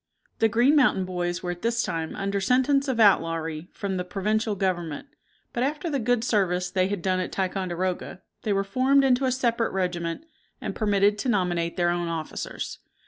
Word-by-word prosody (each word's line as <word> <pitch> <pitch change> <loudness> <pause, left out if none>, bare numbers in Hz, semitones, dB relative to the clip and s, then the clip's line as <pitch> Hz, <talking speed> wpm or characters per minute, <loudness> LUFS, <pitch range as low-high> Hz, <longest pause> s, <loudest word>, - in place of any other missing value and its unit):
The 225 - +4
Green 245 +7 +4
Mountain 245 -10 +4
Boys 175 -1 -3
were 175 - -1
at 175 - -7
this 235 0 +1
time 165 -3 -3
under 200 0 -2
sentence 260 +6 +2
of 255 -3 -1
outlawry 165 -5 +2
from 200 -3 -3
the 180 - -1
Provincial 210 +4 -1
Government; 175 - -2 0.5
but 240 - -2
after 300 +5 -1
the 280 - 0
good 245 0 +1
service 185 -6 +1
they 185 -1 +2
had 195 -3 -3
done 185 -1 +1
at 185 - -3
Ticonderoga, 185 -1 -2 0.2
they 215 - -2
were 195 0 +2
formed 260 +7 +3
into 265 0 +3
a 260 - +2
separate 235 -3 0
regiment, 175 - -2 0.3
and - - -4
permitted 205 -1 +2
to 260 - -1
nominate 175 -5 0
their 175 -1 +2
own 175 0 -1
officers. 165 -2 -5
195 Hz, 185 wpm, -26 LUFS, 175-235 Hz, 0.5 s, The